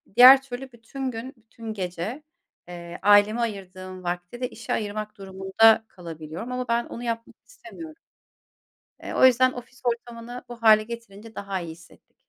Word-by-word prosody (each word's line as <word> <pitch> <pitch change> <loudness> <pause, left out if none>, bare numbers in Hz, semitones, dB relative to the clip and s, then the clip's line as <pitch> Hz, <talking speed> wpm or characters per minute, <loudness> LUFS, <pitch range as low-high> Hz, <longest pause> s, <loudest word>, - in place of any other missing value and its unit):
diğer 260 +2 +10
türlü 265 0 -8
bütün 255 +3 -5
gün, 240 +4 -7
bütün 225 0 -9
gece, 190 - -4 0.4
eee, 175 -1 -8
aileme 205 +3 +5
ayırdığım 185 -4 -5
vakti 175 +6 -5
de 250 - -1
işe 230 - -5
ayırmak 215 0 -4
durumunda, 195 +3 +3
kalabiliyorum 165 +4 -8
ama 250 0 -3
ben 235 0 +1
onu 235 - -8
yapmak 230 -1 -4
istemiyorum. 340 -9 -11 1.1
Eee, - - -6
o - - +4
yüzden 255 0 +6
ofis 250 +1 -11
ortamını 240 0 -4
bu 235 -1 -10
hâle 215 -1 +7
getirince 225 -1 -10
daha 195 -2 -4
iyi 170 -1 -6
hissettik. 165 0 -16
225 Hz, 150 wpm, -25 LUFS, 190-245 Hz, 1.1 s, diğer